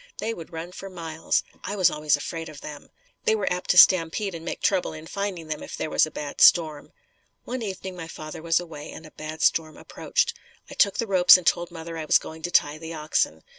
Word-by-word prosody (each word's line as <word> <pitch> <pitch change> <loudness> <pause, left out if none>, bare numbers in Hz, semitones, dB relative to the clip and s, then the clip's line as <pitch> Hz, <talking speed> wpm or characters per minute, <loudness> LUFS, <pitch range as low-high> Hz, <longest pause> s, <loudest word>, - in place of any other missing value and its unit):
They 225 - -2
would 170 -4 -10
run 165 +2 -6
for 195 +1 -9
miles. 165 -3 -2 0.2
I 205 - -4
was 185 -4 +4
always 150 -1 +1
afraid 165 +2 -6
of 150 -2 -11
them. 150 -1 -9 0.4
They 220 - +4
were 205 -4 0
apt 180 - -6
to 180 - +3
stampede 185 +3 +5
and 165 -1 -8
make 170 - -5
trouble 195 -5 0
in 155 0 -9
finding 195 -2 -4
them 155 -1 -5
if - - -8
there 155 - -4
was - - +3
a - - -8
bad 150 -2 -6
storm. 155 -4 +5 0.5
One 255 0 -4
evening 190 -3 -6
father 155 0 -8
was 165 +1 +2
away 155 -4 -9
and 160 - -10
a 155 - -13
bad 155 +1 -6
storm 160 -1 +1
approached. 470 - -1 0.4
I - - -7
took 200 -2 +2
the 230 - 0
ropes 185 -3 +7
and 180 - -8
told 175 0 +1
mother 165 -1 -7
I 155 - -4
was - - +5
going 160 0 -9
to 175 - -3
tie 150 -3 +2
the 165 0 -7
oxen. 150 - -1
165 Hz, 230 wpm, -25 LUFS, 155-185 Hz, 0.5 s, ropes